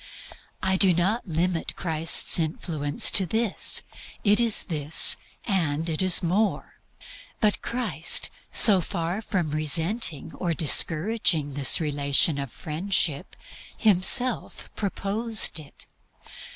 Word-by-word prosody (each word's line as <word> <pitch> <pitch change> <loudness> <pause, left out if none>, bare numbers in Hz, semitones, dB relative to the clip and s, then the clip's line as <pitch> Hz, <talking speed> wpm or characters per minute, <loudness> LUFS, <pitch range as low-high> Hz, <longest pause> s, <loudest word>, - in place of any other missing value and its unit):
I 190 0 0
do 190 -1 +2
not 195 +7 -2
limit 170 +1 -4
Christ's 165 0 +3
influence 155 -2 +1
to 190 -2 +5
this: 220 +1 0 0.4
it 205 +1 +2
is 230 -3 +2
this, 155 -3 +2 0.3
and 165 - -2
it 160 0 -3
is 185 -1 +2
more. 195 +5 -3 0.7
But 210 -1 -1
Christ, 245 +1 -2 0.2
so 195 -5 +6
far 175 +2 -5
from 180 -8 -4
resenting 160 - -1
or 170 -2 -4
discouraging 160 -1 +1
this 140 -1 +3
relation 145 -1 0
of 140 -3 -7
Friendship, 160 -2 -3 0.4
Himself 220 +5 +2
proposed 210 0 0
it. 150 -2 -15
175 Hz, 110 wpm, -23 LUFS, 155-205 Hz, 0.7 s, so